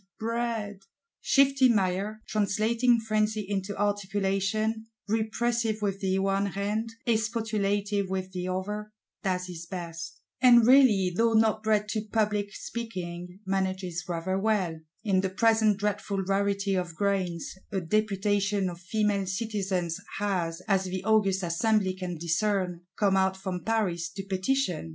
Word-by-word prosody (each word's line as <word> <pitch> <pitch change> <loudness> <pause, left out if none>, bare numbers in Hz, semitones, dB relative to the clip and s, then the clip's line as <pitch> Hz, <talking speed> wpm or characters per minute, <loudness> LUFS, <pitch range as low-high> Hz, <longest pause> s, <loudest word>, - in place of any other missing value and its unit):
Bread!' 220 -4 -3 0.3
Shifty 275 -2 +4
Maillard, 200 0 0
translating 225 +4 +2
frenzy 215 -1 0
into 200 0 -3
articulation; 205 +2 0 0.2
repressive 225 +1 0
with 195 -1 -1
the 190 -1 0
one 195 +1 +1
hand, 205 +3 -2 0.2
expostulative 215 -3 0
with 190 0 -3
the 180 -1 -4
other, 210 +3 -3 0.3
does 185 -2 -1
his 175 -2 -8
best; 165 -2 -6 0.2
and 240 -2 +7
really, 225 -8 +5
though 230 +3 +3
not 220 -1 +3
bred 215 -1 +1
to 215 0 -1
public 210 -1 0
speaking, 180 -5 -6
manages 190 -2 -1
rather 175 +3 -1
well:—In 185 -2 -1
the 190 - -1
present 220 +1 +3
dreadful 200 -1 -1
rarity 200 +1 0
of 180 -3 -2
grains, 185 -4 -1 0.2
a 195 - 0
Deputation 205 0 0
of 170 - -10
Female 205 0 0
Citizens 190 -4 -2 0.2
has, 185 -4 -1
as 195 -2 +2
the 185 0 -4
august 200 -3 +2
Assembly 190 +3 +1
can 180 -2 -5
discern, 180 +1 0 0.2
come 200 -2 +3
out 190 0 +2
from 190 -2 -4
Paris 185 -7 0
to 195 +3 -7
petition. 190 - -1
200 Hz, 130 wpm, -28 LUFS, 185-215 Hz, 0.3 s, and